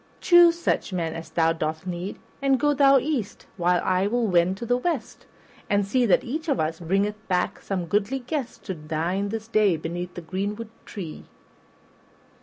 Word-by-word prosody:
Choose 345 -1 +6
such 340 - -1
men 170 -3 -2
as 165 0 -7
thou 165 -1 +2
dost 160 +1 -3
need, 180 +2 -4 0.2
and 270 -1 +3
go 295 +3 +3
thou 275 -1 +6
east 265 -6 -2
while 180 -1 +2
I 185 +1 +2
will 240 +2 +1
wend 180 -1 +2
to 235 - -5
the 245 +1 +2
west, 255 -6 -3 0.4
and 200 -1 +2
see 245 +4 +2
that 190 - +4
each 310 +6 -4
of 275 - +1
us 160 +1 -1
bringeth 200 +5 -1
back 180 -1 0
some 185 -3 -3
goodly 205 +8 0
guest 265 0 -5
to 190 - -4
dine 165 +5 -2
this 220 +1 -5
day 210 -6 +3
beneath 175 +3 -5
the 175 - -6
greenwood 205 +6 -4 0.2
tree." 170 -7 -7
200 Hz, 180 wpm, -25 LUFS, 175-245 Hz, 0.4 s, Choose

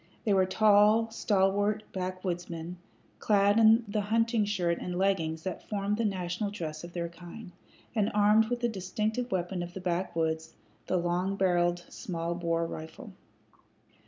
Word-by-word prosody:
They 210 - +2
were 190 -1 +3
tall, 215 +2 +4
stalwart 205 0 +1
backwoodsmen, 180 -2 -4 0.4
clad 205 0 +3
in 225 +1 +6
the 210 +1 -1
hunting 225 +1 +1
shirt 175 -4 0
and 180 0 -4
leggings 165 -5 0
that 185 -2 -6
formed 205 0 -1
the 230 - 0
national 185 0 -2
dress 160 -6 -6
of 175 0 -9
their 170 -1 -2
kind, 175 +4 -11 0.4
and 215 -2 +1
armed 210 +1 +5
with 245 0 -2
the 240 - +2
distinctive 215 +4 -2
weapon 180 0 -2
of 175 0 -7
the - - -4
backwoods, 165 -3 -2 0.3
the 185 - +1
long 175 +3 0
barreled, 175 -2 +1
small 170 -2 -4
bore 170 -1 -1
rifle. 165 +8 -8
190 Hz, 150 wpm, -29 LUFS, 175-210 Hz, 0.4 s, in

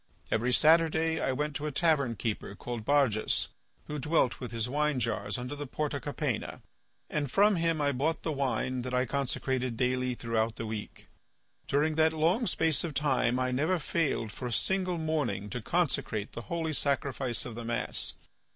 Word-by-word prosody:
Every 120 +3 +1
Saturday 160 +2 +4
I - - +1
went 150 +2 -2
to 150 - -4
a - - -2
tavern 140 -6 +2
keeper 105 -2 -3
called 120 -1 -5
Barjas, 130 -5 +2 0.4
who 150 0 -4
dwelt 145 -3 +1
with 125 - -6
his 115 0 -1
wine 150 +1 +1
jars 115 0 -1
under 125 +3 -5
the 145 0 -6
Porta 145 +1 -2
Capena, 145 -5 -3 0.4
and 145 -3 -2
from 205 +8 +4
him 165 -1 +1
I 145 -1 +2
bought 145 +5 -1
the 160 - -1
wine 130 -2 -1
that 125 +1 -3
I 125 +1 +2
consecrated 130 -2 -1
daily 125 0 0
throughout 115 -1 -1
the 115 - -5
week. 110 -1 -6 0.6
During 150 +3 +2
that 160 0 +4
long 170 +9 +2
space 160 -3 +2
of 160 -5 -4
time 130 -4 +2
I 130 0 0
never 155 +8 +1
failed 150 -9 -1
for 125 - -5
a - - -4
single 185 +6 +1
morning 135 - -1
to 125 - -3
consecrate 120 - 0
the 120 - -6
holy 165 -2 -1
sacrifice 135 -3 0
of 120 - -6
the 120 +1 -6
mass. 120 +1 -1
140 Hz, 180 wpm, -30 LUFS, 120-155 Hz, 0.6 s, Saturday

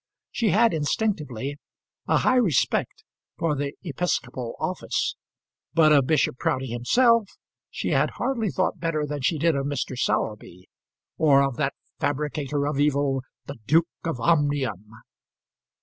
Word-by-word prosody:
She 230 -3 0
had, 225 +5 +4
instinctively, 145 - -2 0.5
a - - +3
high 255 - +3
respect 185 - +1 0.3
for 165 -2 0
the 140 0 -3
episcopal 140 -7 -3
office; - - -2 0.6
but 155 -2 +6
of 140 -3 +5
Bishop 155 -5 +1
Proudie 130 -2 -1
himself 230 - +3 0.4
she - - -3
hardly 235 -6 0
thought 185 - -1
better 160 -3 -1
than 145 -1 -4
she 155 +5 +1
did 160 +1 +2
of 140 0 -1
Mr. 140 -2 -3
Sowerby, 105 -7 -2 0.5
or 140 -3 +5
of 135 -2 -1
that 140 -2 -1 0.2
fabricator 145 0 -1
of 145 -1 -1
evil, 140 -2 +1 0.2
the 140 -2 -8
Duke 165 +2 +4 0.2
of 165 -7 -3
Omnium. 135 - +1
145 Hz, 135 wpm, -25 LUFS, 135-165 Hz, 0.6 s, but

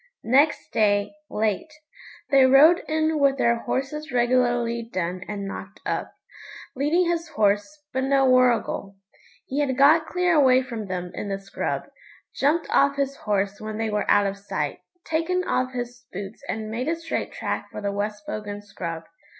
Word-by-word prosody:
Next 280 +6 +2
day, 205 +2 +2 0.2
late, 215 +7 -1 0.6
they 270 -2 +6
rode 300 +6 +7
in 315 0 +1
with 275 -1 +3
their 235 -2 +3
horses 275 +6 -3
regularly 240 -1 +1
done 180 0 -2
and 205 -1 -4
knocked 195 +1 -8
up, - - -3 0.6
leading 310 +7 +2
his 340 -1 -1
horse, 210 +7 0
but 260 0 0
no 270 0 +3
Warrigal. 250 -6 +2 0.5
He 275 - -3
had 265 -3 0
got 310 +4 +5
clear 360 -1 +1
away 260 -4 +5
from 230 -5 -6
them 180 -1 -4
in 205 - -5
the 195 - -1
scrub, 195 0 -3 0.5
jumped 305 +4 +1
off 280 0 +4
his 275 -1 -1
horse 205 -1 -1
when 215 0 -5
they 225 -1 -1
were 210 0 -1
out 205 0 +5
of 200 0 -3
sight, 200 - -3 0.3
taken 330 +3 0
off 255 -6 -1
his 245 0 -5
boots 195 +3 -7
and 215 0 -3
made 245 +5 -3
a 330 - +1
straight 330 0 -4
track - - -4
for - - -6
the 200 -1 -2
West 205 +1 -3
Bogan 205 -1 -5
scrub. 170 -5 -6
245 Hz, 165 wpm, -24 LUFS, 205-280 Hz, 0.6 s, rode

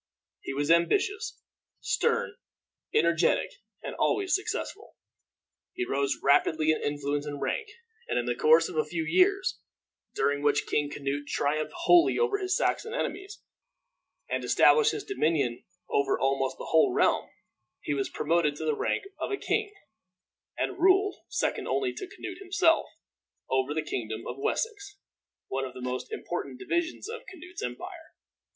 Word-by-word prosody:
He - - -6
was 145 +3 +1
ambitious, 405 - +2 0.4
stern, 465 - 0 0.6
energetic, 445 - +2 0.3
and - - -5
always 390 -2 +1
successful. 415 +3 -3 0.8
He 365 - -2
rose 140 - 0
rapidly 155 +2 +4
in 155 - -1
influence 145 0 -2
and 145 -1 -5
rank, 445 - -2 0.4
and - - -1
in 120 - 0
the 120 - 0
course 155 +6 +5
of - - -8
a 155 - +3
few 165 +1 -3
years, 375 - +2 0.6
during 145 0 +1
which 145 0 +2
King 145 -1 0
Canute 145 0 -3
triumphed 155 - -1
wholly 345 0 +5
over 445 -4 +1
his 375 -1 0
Saxon 455 +2 0
enemies, 400 -3 -4 0.8
and - - -2
established 450 -1 +5
his 425 - -4
dominion 155 - 0 0.2
over 140 -1 +1
almost 135 0 0
the - - -7
whole 160 -4 +5
realm, - - +2 0.5
he 145 - -2
was 135 -1 -1
promoted 155 -1 +1
to 160 - -5
the 155 -1 +1
rank - - -1 0.2
of - - -2
a 405 - -1
king, 430 0 -1 0.9
and - - -2
ruled, 385 +2 +4
second - - -1
only 385 -2 0
to 385 - -6
Canute 365 -1 -8
himself, 355 -4 +2 0.6
over 130 +1 +1
the 155 +1 -1
kingdom 110 -6 -4
of 125 - -6
Wessex, 415 - -2 0.5
one 135 0 -2
of 130 -1 -6
the - - -7
most 125 - -4
important 435 - -4
divisions 345 -1 -2
of 460 +1 -6
Canute's 360 0 -10
empire. 125 0 -7
165 Hz, 150 wpm, -28 LUFS, -, 0.9 s, course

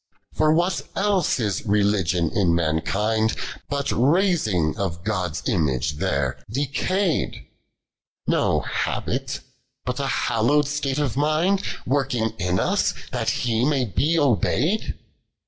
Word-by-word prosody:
Fi>r 155 0 +3
what 170 +2 +2
eUe 195 -7 +1
is 105 -4 -1
Beugios 100 -5 +1
in 90 -6 +3
mankind. 105 +7 +1 0.3
fiat 140 -1 -1
tai^g 135 - +2
of 85 -3 -3
Gdil's 90 -6 -2
image 75 - 0
there 70 -3 -1
decay'd? 150 - -1 0.8
No - - +2
habit, - - -2 0.4
bnt - - -2
a - - -1
hallowed 140 +6 +2
state 145 -2 -1
of 145 -6 0
mind 155 +7 +2 0.2
W\'rkiEj 125 -4 0
ia 90 0 +1
us, 190 - +1 0.2
that 120 -3 -1
He 115 -2 0
may 135 -2 +2
be 150 - +1
obey'd 145 - +1
120 Hz, 115 wpm, -23 LUFS, 95-150 Hz, 0.8 s, Fi>r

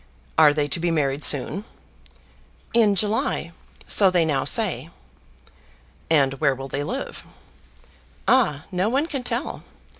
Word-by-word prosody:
Are 155 -2 +6
they 145 0 -1
to 145 - -1
be 175 +1 -1
married 145 -3 -1
soon?" 145 +8 +2 1.1
"In 220 -3 +4
July; 205 -4 -1 0.4
so 195 -2 +6
they 175 -3 +1
now 140 -4 -1
say." - - +1 1.2
"And 140 -4 +3
where 135 - +2
will 135 +1 -8
they 140 +1 -4
live?" 255 - -5 1.0
"Ah! 155 - +2
no 185 +3 0
one 275 +6 0
can 290 -5 -5
tell. 245 +3 -4
170 Hz, 130 wpm, -22 LUFS, 145-215 Hz, 1.2 s, Are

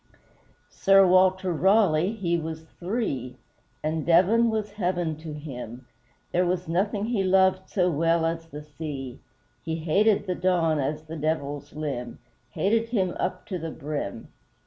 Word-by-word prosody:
Sir 195 -1 +5
WALTER 185 0 +3
RALEIGH, 190 +1 +3
he 170 -4 0
was 160 -1 -4 0.2
THREE 170 - -3 0.5
And 155 0 -1
Devon 190 +8 +4
was 215 -2 -2
heaven 175 -5 -1
to 155 0 -8
him, 130 -5 -8 0.5
There 180 - +2
was 180 0 -1
nothing 200 +5 0
he 225 -4 0
loved 190 0 +3
so 180 -2 +1
well 165 +2 +2
as 165 0 -2
the 150 -2 -9
sea 145 -4 -7 0.4
He 160 -1 -2
hated 195 +7 +2
the 185 - -1
Don 175 -4 +1
as 150 +3 -2
the 160 +1 -8
Devil's 145 -2 -3
limb 135 -6 -4 0.3
Hated 225 +3 0
him 190 -7 0
up 185 - -2
to 185 - -4
the 165 0 -4
brim! 145 -8 -5
170 Hz, 145 wpm, -26 LUFS, 155-190 Hz, 0.5 s, Sir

